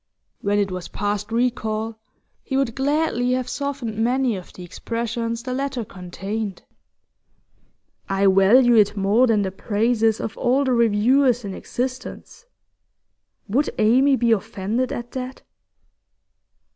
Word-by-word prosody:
When 205 +1 +1
it 200 -2 0
was 185 -1 -5
past 205 +1 -3
recall, 225 -2 -1 0.4
he 265 - -3
would 270 -4 0
gladly 270 -3 0
have 255 -1 -1
softened 270 -6 -4
many 245 0 +1
of 185 -2 -9
the 180 - -11
expressions 230 +4 -4
the 255 0 -4
letter 265 -3 -2
contained. 195 +3 -6 1.5
'I 195 0 +1
value 200 +6 +5
it 210 -2 +4
more 205 +6 +3
than 215 -3 +2
the 190 - -2
praises 220 +3 +1
of 220 - -4
all 260 +3 +2
the 260 -2 +1
reviewers 235 +2 +3
in 195 - -5
existence' 260 - -6 1.0
would 260 +9 +1
Amy 260 +6 +4
be 235 -2 +1
offended 225 +3 -1
at 240 0 -5
that? 260 0 -6
230 Hz, 130 wpm, -22 LUFS, 205-255 Hz, 1.5 s, value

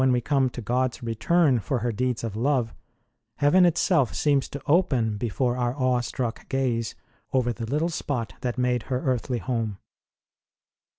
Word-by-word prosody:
ROSE - - +4
OF - - +4
LIMA - - +4
we - - 0
come 135 +1 +2
to 120 - -7
God 125 +3 0
s - - -14
return 130 +4 +2
for 130 +5 -1
her 120 +1 0
deeds 125 +2 -1
of 110 -3 -4
love, 125 -1 +1 0.6
heaven 175 +6 +5
itself 165 - +2
seems 145 -2 +2
to 140 - -7
open 135 - +2
before 120 +3 -1
our 120 0 0
awe 130 -2 +2
struck 120 -1 -4
gaze 125 -4 -1 0.4
over 125 -2 +2
the 115 0 -6
little 150 +7 0
spot 130 -8 -3
that 125 -1 -2
made 125 -1 +1
her 130 -1 0
earthly 125 -1 -1
home. 115 -5 -2
125 Hz, 180 wpm, -25 LUFS, 115-135 Hz, 0.6 s, heaven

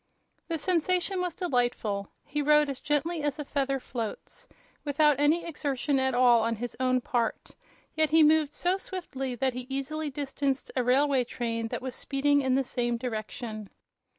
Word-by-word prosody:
The 330 - -1
sensation 365 +3 +1
was 360 -3 -2
delightful. 240 - -1 0.2
He 295 - -2
rode 300 0 +4
as 270 - -7
gently 300 +3 -1
as 290 0 -1
a 295 - -5
feather 275 -1 -1
floats, 250 - -6 0.4
without 295 -1 +3
any 315 +4 +3
exertion 285 -3 -1
at 265 -1 +1
all 245 -2 +5
on 230 +1 0
his 240 +2 -5
own 255 -1 +2
part; 235 -2 -2 0.4
yet 315 -1 +2
he 320 +1 +6
moved 305 -1 +4
so 360 +2 +1
swiftly 270 -10 -5
that 260 +1 0
he 250 0 -6
easily 290 +3 -2
distanced 275 -1 -2
a 255 - +1
railway 265 +1 +3
train 230 -2 -3
that 240 - -5
was 260 -1 -4
speeding 285 +2 +1
in 260 -1 +1
the 270 +1 +3
same 240 -2 -1
direction. 220 -2 -5
275 Hz, 170 wpm, -28 LUFS, 245-300 Hz, 0.4 s, he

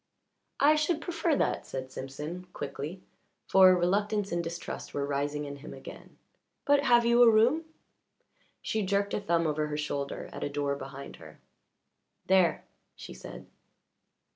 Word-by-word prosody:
"I 290 +2 +6
should 305 +1 +1
prefer 335 -1 0
that," - - -1
said 130 0 -6
Simpson 150 +8 -7
quickly, 145 +6 -6 0.4
for 185 -1 +7
reluctance 200 +3 0
and 170 0 -1
distrust 170 +1 -6
were 140 - 0
rising 145 +1 -2
in 140 0 -7
him 140 - -10
again. - - -12 0.5
"But 285 0 +4
have 240 -2 +5
you 235 +1 +5
a 240 - +9
room?" 240 +9 +3 1.0
She 220 - -1
jerked 200 +1 0
a - - 0
thumb 170 -4 +1
over 150 0 0
her 150 0 -3
shoulder 145 -2 -3
at - - -6
a - - -1
door 145 -1 -1
behind 140 0 -9
her. - - -14 0.9
"There," 185 -4 +3 0.3
she - - -10
said. - - -10
175 Hz, 150 wpm, -29 LUFS, 145-220 Hz, 1.0 s, a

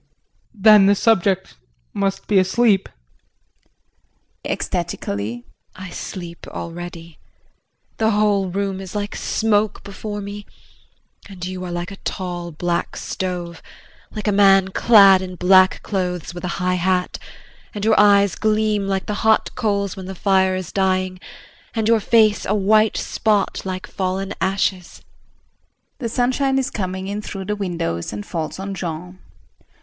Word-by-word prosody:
JEAN. 200 - -17
Then 210 -2 +8
the 200 - +5
subject 195 -3 +1 0.4
must 195 -1 -2
be 200 -2 +3
asleep! 195 +1 +2 1.5
JULIE - - -1
[Ecstatically]. 105 +4 -4 0.3
I 185 -1 -9
sleep 175 -3 -7
already. 170 -1 -8 0.8
The 220 0 +2
whole 205 -3 +2
room 195 +1 -2
is 190 +1 -9
like 205 0 -3
smoke 215 -1 0
before 205 +1 -6
me 205 0 -7 0.8
and 185 -2 -7
you 185 0 -5
are 180 - -5
like 175 +3 -4
a 195 - -9
tall 175 -3 -5
black 170 +2 -2
stove, 175 -2 -4 0.5
like 215 -1 -6
a - - +3
man 195 -1 +5
clad 195 -2 +6
in 185 -1 -6
black 185 +1 +4
clothes 180 -4 -3
with 175 - -8
a 175 - -3
high 180 -1 0
hat; 180 0 0 0.6
and 205 0 -3
your 220 0 +4
eyes 200 -2 +5
gleam 215 -2 0
like 195 -1 -1
the 210 - -3
hot 220 0 +2
coals 200 -3 -1
when 190 -1 -8
the 190 - -6
fire 190 0 +2
is 185 -1 -5
dying; 185 -1 0 0.6
and 220 -1 0
your 230 0 +4
face 215 0 +3
a 210 - +1
white 215 +2 +3
spot 210 -3 0
like 185 0 -4
fallen 190 +1 -3
ashes. 190 -1 -1 1.0
[The 235 -4 -3
sunshine 260 +3 +1
is 265 -1 -1
coming 190 -2 -4
in 205 +1 -3
through 195 -2 -6
the 210 +2 -2
windows 170 - -3
and 105 0 -6
falls 160 -2 -4
on 195 +1 -5
Jean. 180 0 -6
195 Hz, 145 wpm, -20 LUFS, 180-210 Hz, 1.5 s, Then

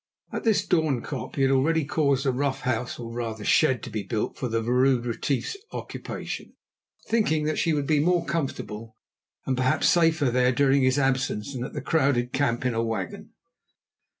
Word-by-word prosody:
At - - -4
this 220 -2 +3
Doornkop 150 -6 -1
he 135 - +1
had 135 - +3
already 150 +4 +2
caused 140 -2 +1
a 135 - +3
rough 135 +2 -1
house, 125 -1 -2
or 115 -1 -7
rather 115 -3 -4
shed, 130 -7 +3
to - - -7
be 110 - -2
built 105 +1 -3
for 130 - -3
the 115 -1 0
Vrouw 125 +3 +3
Retief's 125 - -2 0.2
occupation, - - -6 0.5
thinking 185 -10 +1
that 155 +1 -1
she 165 - +2
would 145 -2 0
be 150 0 +2
more 170 +2 +2
comfortable 115 -8 -4 0.5
and 130 - 0
perhaps 130 0 +2
safer 160 -6 +3
there 125 +1 +3
during 140 +1 +3
his 130 +1 +3
absence 135 -3 0
than 125 -2 -4
at - - -6
the - - -4
crowded 135 -6 +1
camp 130 -3 0
in 125 - +1
a 115 - 0
wagon. 110 -6 -4
130 Hz, 180 wpm, -26 LUFS, 120-150 Hz, 0.5 s, this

